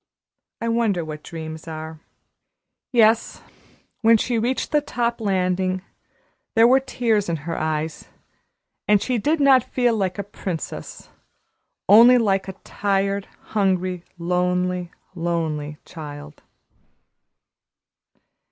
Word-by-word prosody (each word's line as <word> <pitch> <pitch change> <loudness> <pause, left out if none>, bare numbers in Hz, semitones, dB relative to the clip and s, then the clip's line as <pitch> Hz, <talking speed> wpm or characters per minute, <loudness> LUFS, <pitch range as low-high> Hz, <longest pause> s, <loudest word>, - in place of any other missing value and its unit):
I 230 - -3
wonder 225 -7 +1
what 155 -1 -7
dreams 160 -1 -8
are." 160 0 -7 0.9
Yes, 225 -2 +3 0.6
when 225 0 +6
she 235 +1 0
reached 245 +4 -1
the 300 -1 +3
top 240 -4 -2
landing 185 -2 0 0.7
there 225 +1 +7
were 260 +2 +5
tears 230 -7 0
in 170 - 0
her 170 - -3
eyes, 155 0 -3 0.8
and 210 -1 +5
she 250 +3 -1
did 300 +9 +1
not 275 -2 +6
feel 245 -2 +1
like 190 -4 -1
a 200 - -2
princess 185 -4 -6 0.8
only 235 +5 +8
like 195 -5 +1
a 190 - -5
tired, 200 0 -1 0.3
hungry, 185 -3 0
lonely, 180 +1 0 0.2
lonely 160 -4 -2
child. 150 -2 -10
190 Hz, 110 wpm, -22 LUFS, 170-230 Hz, 0.9 s, only